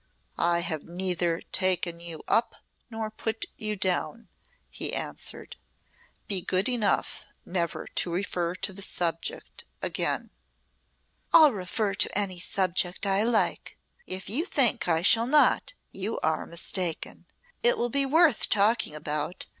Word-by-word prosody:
"I 170 0 +2
have 160 -3 -3
neither 175 -1 -2
taken 185 -2 +1
you 170 -2 -8
up 230 - +2 0.3
nor 225 -1 -4
put 220 +1 -3
you 215 -1 -1
down," 190 +4 -1 0.4
he - - -3
answered. - - -6 0.7
"Be 195 -3 0
good 185 +2 +1
enough 240 -5 0 0.2
never 170 -3 -2
to - - -1
refer 175 -1 -2
to 190 - -1
the 200 - -7
subject 165 -3 -2 0.2
again." - - -1 1.0
"I'll 310 -3 +8
refer 195 +1 -2
to 200 - +1
any 190 -3 0
subject 185 0 0
I 195 0 +2
like. 225 0 +1 0.3
If 185 0 -4
you 270 - +1
think 270 - +2
I 165 -1 +2
shall 230 +4 +6
not 300 - +4 0.2
you 200 +4 -4
are 160 0 -1
mistaken. 170 0 -2 0.3
It 485 +1 +4
will 240 - 0
be 275 +1 +2
worth 310 -3 +4
talking 210 -5 +2
about. 150 +2 -3
190 Hz, 135 wpm, -27 LUFS, 175-225 Hz, 1.0 s, I'll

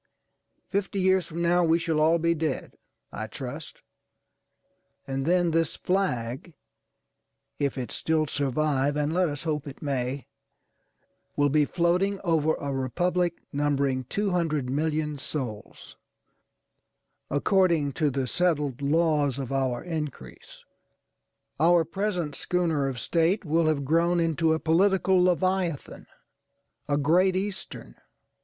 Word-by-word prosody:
Fifty 200 0 -1
years 185 -2 +2
from 170 +1 -4
now 175 +1 +3
we 165 0 +4
shall 165 -2 -1
all 160 +2 +4
be 170 0 +2
dead, 155 -4 -3 0.4
I - - -5
trust, - - -8 1.2
and 135 +1 -3
then 175 -1 +3
this 165 -1 0
flag, 155 -5 -2 1.0
if 140 -1 -1
it 125 -2 -4
still 160 -1 0
survive 145 0 0
(and 150 +1 0
let 180 -1 +2
us 145 -2 -6
hope 150 -3 -2
it 140 - -9
may), 135 -2 -2 1.1
will 145 0 +3
be 150 +1 +3
floating 180 +5 +1
over 160 -3 +2
a 140 -1 -4
Republic 175 +7 -1
numbering 140 -2 0
200,000,000 155 - -1
souls, 125 -7 -5 1.3
according 165 -1 +2
to 150 +2 0
the 135 -1 -2
settled 150 -3 0
laws 150 -2 +2
of 135 -2 -5
our 130 -3 -1
increase. 150 - -7 1.0
Our 170 +1 +4
present 180 -3 -2
schooner 165 -3 0
of 130 -3 -4
State 170 - +1
will 160 +1 +2
have 145 -3 0
grown 170 +4 +2
into 165 -1 +2
a - - -3
political 190 +3 +3
leviathanâ€"a 165 -6 -3
Great 180 +6 +3
Eastern. 195 +1 -4
155 Hz, 120 wpm, -26 LUFS, 140-175 Hz, 1.3 s, we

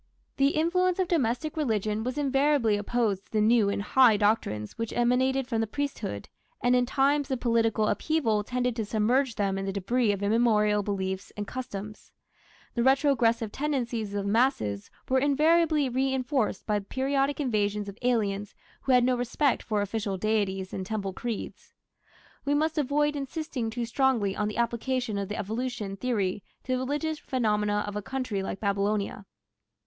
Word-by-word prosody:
The 275 +1 +3
influence 360 +3 +2
of 375 -2 +1
domestic 305 -1 0
religion 220 -7 0
was 255 +3 -3
invariably 275 -5 +2
opposed 205 -2 -1
to - - -35
the 215 - +2
new 215 -1 +4
and 200 0 -2
high 240 -1 +5
doctrines 200 - 0
which 230 -1 -4
emanated 260 +2 +2
from 225 -3 0
the 225 - -1
priesthood, 275 - -4 0.3
and 245 0 +3
in 250 0 +2
times 280 +2 +2
of 260 -2 -1
political 225 -3 +2
upheaval 230 -11 +1
tended 250 +1 -1
to 225 - 0
submerge 235 +4 +1
them 195 -2 0
in 195 - -3
the 195 - -1
debris 210 +4 +1
of 200 0 -3
immemorial 210 -1 +3
beliefs 190 -1 -3
and 205 - -3
customs. 210 -3 -7 0.6
The 235 - 0
retrogressive 245 -4 +3
tendencies 240 -7 -2
of 200 -1 -2
the 200 - 0
masses 210 - +1 0.2
were 260 0 +3
invariably 300 +1 +3
reinforced 260 -3 0
by 210 -1 +1
the 200 - -12
periodic 275 +4 0
invasions 210 -6 0
of 200 +2 -9
aliens 210 -5 0 0.3
who 265 - +1
had 250 -1 +5
no 255 +1 +3
respect 250 +3 0
for 210 -2 -1
official 205 -1 -3
deities 195 -2 -1
and 190 - -3
temple 195 -1 -3
creeds. 235 +1 -6 0.7
We 285 +1 +1
must 315 +1 +1
avoid 295 +1 +1
insisting 275 -4 -3
too 235 +1 -3
strongly 235 -5 +1
on 210 - -1
the 210 - -5
application 235 -1 -1
of 200 -1 -4
the 210 - -4
evolution 220 -1 -3
theory 205 -4 -1 0.2
to 255 - -5
the 255 - +1
religious 295 +4 -2
phenomena 210 -4 0
of 205 0 -6
a 210 - -2
country 255 -4 -3
like 190 - -4
Babylonia. 200 0 -1
235 Hz, 170 wpm, -27 LUFS, 205-265 Hz, 0.7 s, high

